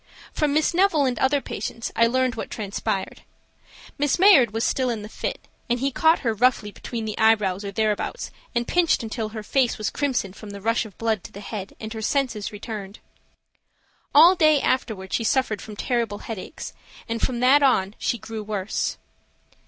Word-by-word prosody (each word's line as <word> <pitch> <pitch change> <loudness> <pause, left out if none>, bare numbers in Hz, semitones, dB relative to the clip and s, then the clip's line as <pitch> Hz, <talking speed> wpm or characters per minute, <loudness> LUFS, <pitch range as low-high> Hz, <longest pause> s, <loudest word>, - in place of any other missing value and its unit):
From 300 -2 +1
Miss 310 +3 +2
Neville 340 -5 +3
and 245 -4 -1
other 275 +2 +2
patients 230 - -5
I 230 - +5
learned 255 +1 +1
what 225 - -6
transpired. 195 -2 -3 0.8
Miss 290 -1 +2
Mayard 360 - +7
was 225 +2 -2
still 255 0 +1
in 225 -3 -3
the - - -7
fit, - - -4 0.3
and 240 +1 +1
he 275 +2 0
caught 320 +5 +3
her 230 -4 0
roughly 225 -2 +2
between 225 +2 -6
the 215 - -3
eyebrows 210 -3 +3
or 200 - -4
thereabouts, 215 0 -1 0.2
and 235 0 0
pinched 345 -7 +2
until 220 -1 -3
her 215 -1 -7
face 250 +2 +1
was 215 - -2
crimson 255 -10 -1
from 210 +1 -11
the 200 0 -7
rush 230 +3 0
of 200 - -18
blood 220 -4 -1
to - - -9
the 200 - -10
head, 205 -1 -7
and 220 0 -6
her 220 - -6
senses 240 -4 -1
returned. 205 -1 -7 1.2
All 330 +5 +9
day 310 -4 +4
afterward 220 -9 -1
she 230 - +1
suffered 225 -2 +1
from 215 - -9
terrible 230 -2 -1
headache, 220 +4 -7 0.4
and 230 0 -3
from 245 -2 0
that 270 +3 +6
on 205 -8 +3
she 235 - 0
grew 225 0 -7
worse. 210 -1 -2
230 Hz, 185 wpm, -24 LUFS, 210-265 Hz, 1.2 s, All